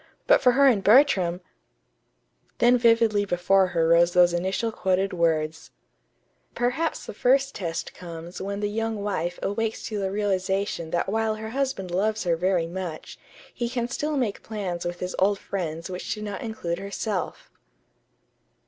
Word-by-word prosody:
but - - +5
for 250 -1 +5
her 280 +2 +5
and 230 -8 +4
Bertram 195 -7 +4 1.2
Then 240 +1 +5
vividly 230 -3 +3
before 190 0 +2
her 165 -2 +1
rose 170 +1 +5
those 175 -1 +5
initial 190 +6 -1
quoted 190 -1 0
words: 160 -2 0 0.9
"Perhaps 250 +7 -1
the - - -7
first 270 +5 +2
test 170 -4 -4
comes 170 0 -9
when 200 +1 -4
the 205 - 0
young 225 -1 -2
wife 175 -4 -2
awakes 220 +2 -2
to 215 -2 -4
the 195 -1 -1
realization 195 -3 -1
that 170 - -1
while 220 +2 0
her 220 +1 -7
husband 260 -9 -2
loves 210 +4 0
her 170 -2 +1
very 180 0 +1
much, 170 -2 -6 0.3
he 240 -1 -3
can 240 -1 -2
still 295 +4 -2
make 230 -6 -1
plans 190 -6 -4
with 175 0 -4
his 180 0 -3
old 200 +2 +3
friends 170 -5 -4
which 180 -1 -5
do 210 - -7
not 205 -2 -5
include 200 -7 -4
herself." 200 0 -4
195 Hz, 155 wpm, -25 LUFS, 175-225 Hz, 1.2 s, but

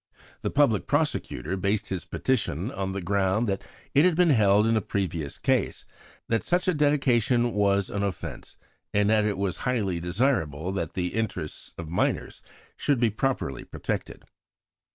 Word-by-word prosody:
The - - -1
Public 140 -8 +2
Prosecutor 145 - -1
based 100 +2 -1
his 95 -3 -3
petition 110 - -1
on 95 -6 -3
the 95 -1 -4
ground 100 +4 +1
that 95 -1 -1 0.3
it 145 - +6
had 180 -2 +4
been 175 -1 +4
held 105 -4 +4
in 115 0 +3
a 110 - +2
previous 85 -7 -3
case - - 0 0.4
'that 115 -1 +1
such 180 +1 +1
a 185 - +4
dedication 130 -5 +2
was 100 -1 +2
an 100 - -2
offence, 100 -2 -5 0.4
and 105 0 +4
that 110 -1 +4
it 105 -2 0
was 95 -2 -1
highly 105 -9 -1
desirable 90 - 0
that 85 -5 -3
the 90 -1 -1
interests 105 -8 -4
of 85 - -6
minors 85 +3 -1 0.4
should 140 -4 +1
be 115 -2 +3
properly 110 - -2
protected.' - - -5
100 Hz, 160 wpm, -26 LUFS, 95-125 Hz, 0.4 s, it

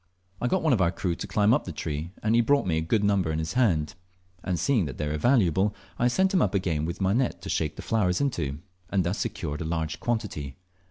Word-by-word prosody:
I 125 - +1
got 190 +8 +1
one 155 -4 +4
of 105 - +2
our 85 - +4
crew 90 -1 -2
to - - -6
climb 105 +1 +3
up - - +1
the 90 - -5
tree, 75 0 -4
and 110 +1 +2
he 120 - +5
brought 140 +4 +2
me 80 -3 +1
a - - -1
good 100 +6 +1
number 100 -5 +2
in 80 - -1
his 80 0 -3
hand; 90 -12 +2 0.5
and 90 -3 -1
seeing 110 - +2
they 70 +2 -4
were 75 0 -2
valuable, 100 - +3 0.2
I 120 - +3
sent 190 +10 +2
him 185 - +4
up - - +1
again 85 -6 0
with 85 +4 -5
my 95 +1 +2
net 125 +2 0
to - - -6
shake - - -1
the - - -8
flowers 90 -5 +1
into, 75 - -2 0.3
and 95 -2 +1
thus 85 +4 -2
secured 75 -5 -3
a - - -1
large 80 -1 -2
quantity. 90 - -3
95 Hz, 250 wpm, -27 LUFS, 80-115 Hz, 0.5 s, he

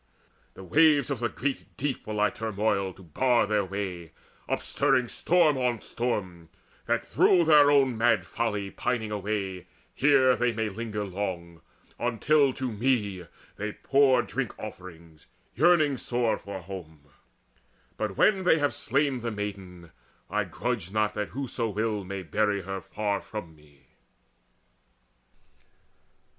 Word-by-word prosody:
The 95 - -10
waves 145 - +4
of 135 - -2
the 120 0 0
great 135 +4 -4
deep 140 -1 -3
will 105 -1 -3
I 105 0 +3
turmoil 105 -3 -1
To 95 - -16
bar 120 - +2
their 105 -1 +1
way, 95 -4 -5 0.4
upstirring 125 -3 +1
storm 160 -3 +2
on 125 -2 0
storm, 95 -9 -4 0.4
That - - +1
through 175 -2 +3
their 150 -2 +7
own 135 -5 +3
mad 115 -1 +3
folly 105 -4 -2
pining 110 -4 -2
away 100 -3 -3 0.3
Here 130 -2 +4
they 120 -1 +1
may 110 0 -1
linger 105 0 -4
long, 90 -4 -5 0.4
until 135 +4 +2
to 130 -1 -3
me 105 -6 -1 0.3
They 105 +1 -4
pour 135 -3 +3
drink 135 -1 -4
offerings, 85 -6 -11 0.3
yearning 155 -1 +4
sore 120 -2 0
for 100 0 -7
home. 85 -5 -9 0.9
But, 105 -3 -3
when 195 -3 +4
they 175 - +4
have 145 -2 +1
slain 140 -2 0
the 120 0 -3
maiden, 95 -5 -7 0.4
I - - 0
grudge 90 - -3
not 105 0 +1
That 105 -1 -3
whoso 125 -3 -3
will 105 0 -1
may 95 0 -6
bury 100 +3 0
her 95 +1 -5
far 105 -2 -2
from 90 -7 -8
me." 70 -2 -23
110 Hz, 135 wpm, -27 LUFS, 95-130 Hz, 0.9 s, their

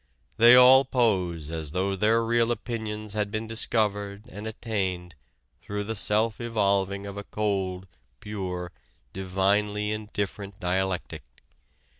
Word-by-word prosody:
"They 120 +2 +8
all 130 +2 +8
pose 90 - 0
as 80 -2 -5
though 95 +2 0
their 110 +4 +2
real 115 0 +2
opinions 110 -3 -4
had 105 -1 -1
been 110 +1 -3
discovered 105 -2 -1
and 105 +3 -7
attained 95 -6 -3 0.5
through 105 +2 -4
the 110 +2 -3
self 110 +2 +1
evolving 100 -3 0
of 100 0 -7
a 100 - -5
cold, 95 -3 -2 0.3
pure, 90 -3 -5 0.4
divinely 100 +3 0
indifferent 105 -2 -4
dialectic... 95 0 -2
105 Hz, 120 wpm, -26 LUFS, 95-110 Hz, 0.5 s, They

